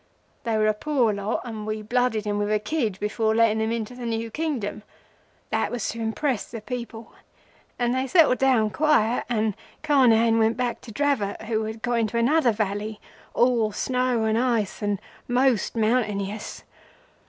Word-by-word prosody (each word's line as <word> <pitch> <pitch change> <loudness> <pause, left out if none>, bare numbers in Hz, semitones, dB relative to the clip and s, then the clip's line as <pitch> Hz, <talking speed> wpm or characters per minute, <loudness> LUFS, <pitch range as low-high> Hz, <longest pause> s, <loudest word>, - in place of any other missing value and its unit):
They 225 -2 +1
were 215 - +2
a 215 - +3
poor 240 -1 +1
lot, 200 +1 -2
and 220 -3 -6
we 215 0 -3
blooded 240 -1 0
'em 205 0 -1
with 205 0 -1
a 215 - +3
kid 215 -3 -2
before 220 +1 0
letting 220 -1 +3
'em 220 +1 0
into 230 0 -3
the 245 -1 -6
new 225 0 -3
Kingdom. 265 -9 -3 0.7
That - - +1
was 245 -4 -3
to 230 - -5
impress 225 +2 -1
the 230 - -6
people, 235 0 -7 0.6
and 240 0 +1
then 260 - +1
they 265 - -2
settled 310 -6 +4
down 250 -5 +3
quiet, 270 -6 +2
and 220 -3 +1 0.3
Carnehan 235 -6 +4
went 225 +1 +2
back 245 -2 -2
to 230 - -10
Dravot 220 -6 -1
who 220 0 -1
had 220 +1 -7
got 240 -1 +1
into 225 +1 -1
another 250 +2 +3
valley, 210 0 -3 0.4
all 235 -3 +3
snow 250 +1 0
and 220 +1 +1
ice 235 -5 0
and 205 -2 -1 0.3
most 245 -3 +2
mountainous. 215 -3 -1
225 Hz, 175 wpm, -25 LUFS, 215-250 Hz, 0.7 s, settled